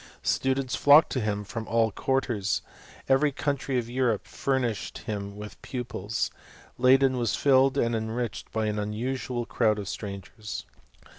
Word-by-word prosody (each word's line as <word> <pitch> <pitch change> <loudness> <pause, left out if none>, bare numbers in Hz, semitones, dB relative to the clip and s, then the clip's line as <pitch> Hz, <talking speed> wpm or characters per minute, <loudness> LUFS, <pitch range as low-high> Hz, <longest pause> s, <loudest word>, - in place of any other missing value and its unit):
Students 130 -1 +1
flocked 145 +3 +7
to 130 - 0
him 105 -1 -1
from 110 +2 -6
all 115 -1 +2
quarters^ 120 -5 0 0.2
— - - -21
every 135 +2 +4
country 140 -1 -1
of 120 -2 -1
Europe 120 -3 0
furnished 125 -6 -1
him 100 -2 -4
with 105 0 -9
pupils; 115 -4 -3 0.5
Leyden 130 +1 +5
was 120 -3 +1
filled 135 0 +4
and 120 -3 +2
enriched 115 +1 -3
by 110 -1 0
an 105 0 -1
unusual 120 +3 -2
crowd 110 -3 +2
of 100 -2 -5
strangers. 100 +1 -6
120 Hz, 145 wpm, -27 LUFS, 105-130 Hz, 0.5 s, flocked